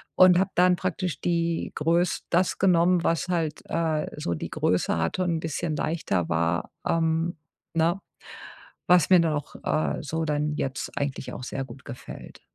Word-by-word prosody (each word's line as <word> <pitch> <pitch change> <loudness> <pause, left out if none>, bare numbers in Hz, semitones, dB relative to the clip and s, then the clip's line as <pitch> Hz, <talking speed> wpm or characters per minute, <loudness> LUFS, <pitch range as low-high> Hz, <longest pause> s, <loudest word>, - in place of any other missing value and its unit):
und 185 -1 +7
habe 195 +1 +1
dann 180 0 +5
praktisch 180 -1 -3
die 170 -1 0
Größ 170 +3 +1
das 175 +2 +1
genommen, 180 -1 +4
was 165 +1 +1
halt, 160 -4 -1
äh, 160 -2 0
so 85 - -2
die - - -5
Größe 90 -2 +1
hatte 85 - 0
und 175 - 0
'n - - -3
bisschen 160 0 -2
leichter 100 - -1
war, 85 +1 0 0.2
ähm 165 0 +1 0.4
ne? 165 +3 +2 0.9
Was 175 -4 +5
mir 185 -1 +7
dann 165 -2 +1
auch, 145 -1 -5
äh, 155 - 0
so 160 +3 -2
dann 150 0 0
jetzt 135 -1 -3
eigentlich 140 -2 -3
auch 125 - -7
sehr 135 - -4
gut 130 0 -13
gefällt. 125 - -10
165 Hz, 165 wpm, -26 LUFS, 145-175 Hz, 0.9 s, und